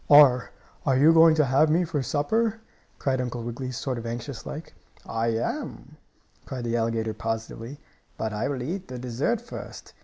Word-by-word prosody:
"Are 140 -4 +7
you - - -30 0.3
are 130 - +3
you 155 +5 +7
going 165 -1 +7
to 155 -2 +4
have 135 +4 +4
me 170 +4 +3
for 160 -4 -1
supper?" 220 - 0 0.5
asked 130 -2 +2
Uncle 120 -1 -3
Wiggily, 120 +2 -4
sort 125 0 -3
of 115 - -6
anxious 120 +2 -5
like. 155 +3 -7 0.3
"I 115 0 -1
am!" 115 0 -3 0.5
cried 125 -2 -5
the 120 0 -1
alligator, 115 -1 0
positively. 115 +4 -4 0.4
"But 110 -1 -2
I 105 - -1
will 135 -3 -2
eat 185 +7 -4
the 125 - -6
dessert 125 - -1
first. 240 - -9
130 Hz, 180 wpm, -26 LUFS, 115-150 Hz, 0.5 s, Are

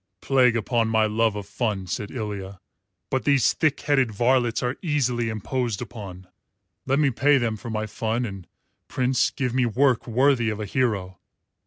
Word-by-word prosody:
"Plague 125 -1 +3
upon 115 +1 0
my 110 -1 +3
love 110 0 +1
of 105 -1 -5
fun," 105 -2 -2
said 100 +3 -4
Ilya, 100 -4 -6 0.5
"but 130 -1 0
these 140 -4 +3
thick 155 -3 0
headed 135 -5 +2
varlets 120 +2 +1
are 125 +1 -1
easily 125 -8 0
imposed 110 +1 -2
upon. 100 -6 -8 0.6
Let 135 +1 +2
me 145 -2 +3
pay 140 +4 +3
them 115 -3 0
for 120 +3 -8
my 110 -1 -2
fun 115 +3 -2
and, 95 -5 -8 0.4
Prince, 130 0 +1
give 130 -4 -3
me 125 -1 +2
work 125 +1 +2
worthy 125 0 +2
of 105 -1 -4
a 105 - -3
hero." 100 -6 -1
115 Hz, 170 wpm, -24 LUFS, 105-130 Hz, 0.6 s, Plague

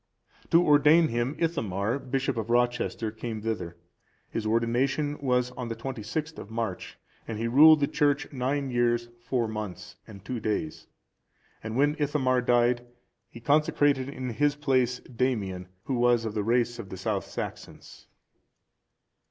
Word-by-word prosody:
To 170 +1 +5
ordain 150 +3 +5
him, 120 +5 -1
Ithamar,(398) 125 - -2
bishop 135 0 0
of 115 -1 -4
Rochester, 120 -2 0
came 110 -1 -6
thither. 90 -7 -3 0.5
His 110 -1 -2
ordination 130 +6 0
was 125 -2 +1
on 125 -1 -6
the 115 - -4
26th 135 +6 -5
of - - -9
March, 110 -4 -4 0.3
and 110 - -4
he 115 +2 -1
ruled 150 +5 +7
the 140 - +3
church 145 -1 0
nine 135 +1 -1
years, 120 -1 +1
four 120 0 -1
months, 105 -4 -6
and 100 -3 -12
two 125 +1 -3
days; 105 -8 -3 0.7
and 110 +2 -5
when 145 +2 +3
Ithamar 135 -4 +1
died, 120 0 +2 0.5
he 115 - -11
consecrated 145 0 +2
in 130 -3 -5
his 145 +4 +1
place 130 -4 +1
Damian,(399) 110 -8 -2 0.2
who 135 - -3
was 120 -1 +3
of 110 - -3
the 105 - -1
race 120 +1 +1
of 100 -5 -7
the 95 - -7
South - - -2
Saxons. - - -8
120 Hz, 150 wpm, -27 LUFS, 115-140 Hz, 0.7 s, ruled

